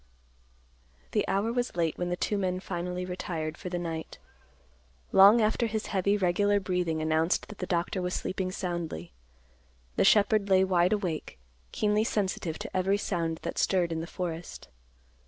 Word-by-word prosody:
The -, -, +1 dB
hour 210 Hz, +4 st, 0 dB
was 245 Hz, 0 st, -1 dB
late 165 Hz, -2 st, 0 dB
when 175 Hz, 0 st, -1 dB
the 175 Hz, -, 0 dB
two 205 Hz, -, -1 dB
men 185 Hz, -2 st, -1 dB
finally 180 Hz, 0 st, -4 dB
retired 170 Hz, -3 st, -4 dB
for 180 Hz, -, -7 dB
the 175 Hz, -, -2 dB
night. 165 Hz, -2 st, -5 dB, 0.9 s
Long 200 Hz, +4 st, +8 dB
after 220 Hz, +2 st, +2 dB
his 220 Hz, -1 st, -3 dB
heavy, 200 Hz, +2 st, +2 dB
regular 205 Hz, +2 st, +2 dB
breathing 180 Hz, -4 st, -1 dB
announced 160 Hz, +3 st, +1 dB
that 210 Hz, -, -10 dB
the 185 Hz, -, -3 dB
doctor 175 Hz, +2 st, -1 dB
was 180 Hz, 0 st, -2 dB
sleeping 185 Hz, -1 st, -2 dB
soundly, 170 Hz, -, -4 dB, 0.9 s
the -, -, +4 dB
shepherd 205 Hz, 0 st, +4 dB
lay 190 Hz, 0 st, +5 dB
wide 180 Hz, 0 st, +3 dB
awake, 175 Hz, -, -3 dB, 0.3 s
keenly 210 Hz, 0 st, +1 dB
sensitive 190 Hz, -7 st, -1 dB
to -, -, -7 dB
every 190 Hz, +2 st, +2 dB
sound 165 Hz, -5 st, -2 dB
that -, -, -3 dB
stirred 180 Hz, -3 st, +2 dB
in 160 Hz, 0 st, -2 dB
the 165 Hz, -, -6 dB
forest. 170 Hz, -, -6 dB
180 Hz, 160 wpm, -29 LUFS, 170-200 Hz, 0.9 s, Long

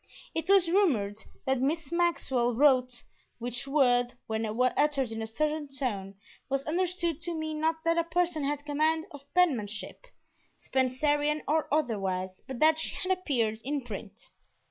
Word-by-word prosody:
It 325 Hz, +2 st, -3 dB
was 390 Hz, -3 st, +6 dB
rumored 275 Hz, -, +2 dB, 0.3 s
that 265 Hz, -1 st, +1 dB
Miss 300 Hz, +2 st, -1 dB
Maxwell 265 Hz, -9 st, +1 dB
"wrote," 255 Hz, -2 st, +3 dB, 0.3 s
which 245 Hz, +3 st, -3 dB
word, 245 Hz, -4 st, +3 dB
when 220 Hz, 0 st, -2 dB
uttered 255 Hz, +3 st, +1 dB
in 225 Hz, 0 st, -4 dB
a 220 Hz, -, -3 dB
certain 300 Hz, +6 st, -1 dB
tone, 215 Hz, -8 st, -3 dB, 0.3 s
was 275 Hz, 0 st, -1 dB
understood 340 Hz, -1 st, -1 dB
to 345 Hz, 0 st, -3 dB
mean 315 Hz, -1 st, -3 dB
not 320 Hz, 0 st, 0 dB
that 335 Hz, 0 st, +3 dB
a -, -, +2 dB
person 335 Hz, -2 st, 0 dB
had 290 Hz, +1 st, -2 dB
command 310 Hz, +2 st, +1 dB
of 285 Hz, 0 st, -13 dB
penmanship, 230 Hz, -, 0 dB, 0.5 s
Spencerian 290 Hz, +3 st, +1 dB
or 310 Hz, +1 st, +1 dB
otherwise, 195 Hz, -10 st, -1 dB
but 265 Hz, -, -5 dB
that 315 Hz, +3 st, +4 dB
she -, -, -1 dB
had 370 Hz, -, -2 dB
appeared 235 Hz, -11 st, -1 dB
in 285 Hz, +2 st, -2 dB
print. -, -, -9 dB
285 Hz, 150 wpm, -29 LUFS, 245-320 Hz, 0.5 s, was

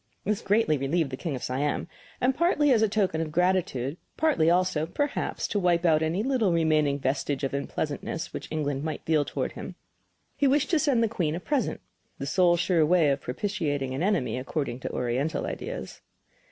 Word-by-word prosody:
This 210 Hz, 0 st, -1 dB
greatly 195 Hz, -8 st, +2 dB
relieved 140 Hz, +2 st, 0 dB
the -, -, -2 dB
King 150 Hz, +1 st, -4 dB
of 125 Hz, -, -6 dB
Siam, 140 Hz, +5 st, -1 dB, 0.3 s
and 255 Hz, +2 st, +2 dB
partly 300 Hz, -2 st, +3 dB
as 230 Hz, -4 st, +4 dB
a 220 Hz, -, +3 dB
token 195 Hz, -6 st, +1 dB
of 160 Hz, -1 st, -3 dB
gratitude, 170 Hz, -5 st, 0 dB
but -, -, -45 dB
partly 290 Hz, -, +3 dB
also, 175 Hz, -3 st, +2 dB
perhaps, 290 Hz, -, -2 dB
to 205 Hz, -, 0 dB
wipe 175 Hz, -2 st, +2 dB
out 160 Hz, -2 st, +4 dB
any 165 Hz, +6 st, 0 dB
little 245 Hz, -7 st, +2 dB
remaining 155 Hz, -4 st, +2 dB
vestige 140 Hz, +1 st, -1 dB
of 135 Hz, -, -1 dB
unpleasantness 145 Hz, +3 st, -3 dB
which -, -, -6 dB
England 145 Hz, -3 st, -2 dB
might 160 Hz, 0 st, -4 dB
feel 155 Hz, -2 st, +3 dB
toward -, -, -3 dB
him, -, -, -8 dB, 0.6 s
he 280 Hz, 0 st, +2 dB
wished 285 Hz, +4 st, +2 dB
to 325 Hz, -, +4 dB
send 275 Hz, -6 st, +2 dB
the -, -, +3 dB
Queen 170 Hz, -8 st, -1 dB
a -, -, -3 dB
present 285 Hz, +7 st, -1 dB, 0.4 s
the -, -, -5 dB
sole 175 Hz, -2 st, +3 dB
sure 175 Hz, -2 st, +2 dB
way 160 Hz, -2 st, +4 dB
of 140 Hz, 0 st, -1 dB
propitiating 145 Hz, -4 st, -2 dB
an 135 Hz, -, -3 dB
enemy, 155 Hz, -, 0 dB
according 130 Hz, -2 st, -3 dB
to -, -, -4 dB
Oriental 130 Hz, +6 st, -1 dB
ideas. -, -, -6 dB
165 Hz, 195 wpm, -27 LUFS, 145-205 Hz, 0.6 s, as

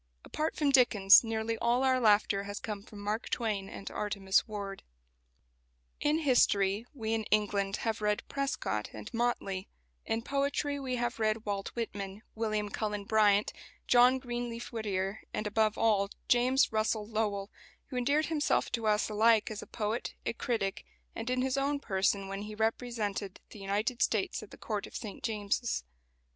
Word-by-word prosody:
Apart 310 Hz, +1 st, -2 dB
from 295 Hz, -2 st, +2 dB
Dickens, 220 Hz, -7 st, +7 dB
nearly 225 Hz, 0 st, -2 dB
all 240 Hz, +2 st, +2 dB
our 260 Hz, -1 st, +3 dB
laughter 205 Hz, -3 st, +3 dB
has 205 Hz, +1 st, -5 dB
come 210 Hz, -2 st, -5 dB
from 210 Hz, +1 st, -13 dB
Mark 210 Hz, +3 st, -2 dB
Twain 210 Hz, -5 st, -1 dB
and 195 Hz, -, -9 dB
Artemus 200 Hz, -2 st, +1 dB
Ward. 200 Hz, -2 st, -5 dB, 1.2 s
In 295 Hz, +1 st, +2 dB
history, 225 Hz, -7 st, +3 dB
we 225 Hz, -6 st, -3 dB
in 220 Hz, -1 st, -1 dB
England 205 Hz, -2 st, +1 dB
have 220 Hz, -1 st, -1 dB
read 210 Hz, 0 st, 0 dB
Prescott 275 Hz, -, -2 dB
and 105 Hz, -1 st, -9 dB
Motley; 225 Hz, -5 st, -1 dB, 0.4 s
in 225 Hz, 0 st, -2 dB
poetry 280 Hz, +1 st, -1 dB
we 260 Hz, -2 st, -2 dB
have 240 Hz, 0 st, -2 dB
read 215 Hz, 0 st, 0 dB
Walt 200 Hz, -1 st, -2 dB
Whitman, 205 Hz, -3 st, -5 dB
William 215 Hz, -2 st, -1 dB
Cullen 210 Hz, 0 st, -3 dB
Bryant, 210 Hz, -1 st, +3 dB, 0.3 s
John 250 Hz, +1 st, +6 dB
Greenleaf 240 Hz, -2 st, -5 dB
Whittier, 200 Hz, -2 st, -2 dB, 0.2 s
and, 215 Hz, -, -2 dB
above 215 Hz, 0 st, +1 dB
all, 205 Hz, -3 st, +3 dB, 0.2 s
James 255 Hz, +2 st, +4 dB
Russell 215 Hz, -1 st, 0 dB
Lowell, 210 Hz, -2 st, -2 dB, 0.4 s
who -, -, -5 dB
endeared 285 Hz, +5 st, +2 dB
himself 310 Hz, -2 st, +1 dB
to 230 Hz, -2 st, -1 dB
us 210 Hz, 0 st, +2 dB
alike 220 Hz, +1 st, +3 dB
as 215 Hz, -, -5 dB
a -, -, -10 dB
poet, 220 Hz, +1 st, -3 dB
a -, -, 0 dB
critic, 225 Hz, -5 st, -2 dB, 0.3 s
and 225 Hz, +2 st, -4 dB
in 255 Hz, 0 st, +1 dB
his 265 Hz, +1 st, 0 dB
own 280 Hz, +1 st, +1 dB
person 195 Hz, -3 st, 0 dB
when 195 Hz, +1 st, -4 dB
he 210 Hz, +1 st, -7 dB
represented 220 Hz, -3 st, -2 dB
the 215 Hz, -, -10 dB
United 210 Hz, +5 st, -1 dB
States 215 Hz, +3 st, +1 dB
at 215 Hz, -, -11 dB
the -, -, -12 dB
Court 210 Hz, -2 st, -3 dB
of -, -, -14 dB
St 210 Hz, -4 st, -6 dB
James's. 220 Hz, -, -1 dB
220 Hz, 165 wpm, -31 LUFS, 205-240 Hz, 1.2 s, Dickens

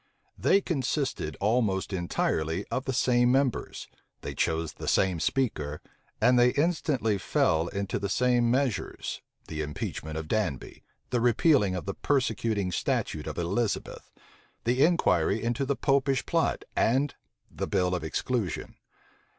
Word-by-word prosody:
They 200 Hz, -, +3 dB
consisted 135 Hz, -, -2 dB
almost 105 Hz, -3 st, +1 dB
entirely 85 Hz, -1 st, -1 dB
of 130 Hz, -, -2 dB
the 130 Hz, -, -1 dB
same 125 Hz, -1 st, +3 dB
members; 135 Hz, -2 st, 0 dB, 0.3 s
they -, -, -5 dB
chose 80 Hz, 0 st, -1 dB
the -, -, -8 dB
same 95 Hz, -3 st, +2 dB
speaker; 75 Hz, -, -1 dB, 0.4 s
and 125 Hz, +2 st, +4 dB
they 125 Hz, 0 st, +5 dB
instantly 140 Hz, -, +1 dB
fell 80 Hz, -2 st, +1 dB
into 100 Hz, +2 st, -3 dB
the 100 Hz, -, -3 dB
same 120 Hz, +1 st, +2 dB
measures, 125 Hz, -3 st, -1 dB, 0.3 s
the 80 Hz, -1 st, -4 dB
impeachment 75 Hz, +1 st, -4 dB
of 80 Hz, 0 st, -5 dB
Danby, 90 Hz, -, -2 dB, 0.3 s
the 125 Hz, -2 st, +1 dB
repeal 130 Hz, +5 st, +4 dB
of 90 Hz, -, -4 dB
the 100 Hz, -, -3 dB
persecuting 110 Hz, -8 st, 0 dB
statute -, -, -1 dB
of -, -, -5 dB
Elizabeth, 100 Hz, +6 st, -2 dB, 0.5 s
the 125 Hz, +3 st, +3 dB
inquiry 105 Hz, -, +2 dB
into 120 Hz, +3 st, -1 dB
the 140 Hz, -, +1 dB
Popish 135 Hz, -1 st, +1 dB
plot, 165 Hz, -1 st, 0 dB
and 135 Hz, +5 st, +2 dB, 0.4 s
the -, -, -4 dB
bill 90 Hz, -3 st, +1 dB
of 90 Hz, -, -2 dB
exclusion. 100 Hz, +3 st, -2 dB
115 Hz, 135 wpm, -28 LUFS, 90-130 Hz, 0.5 s, they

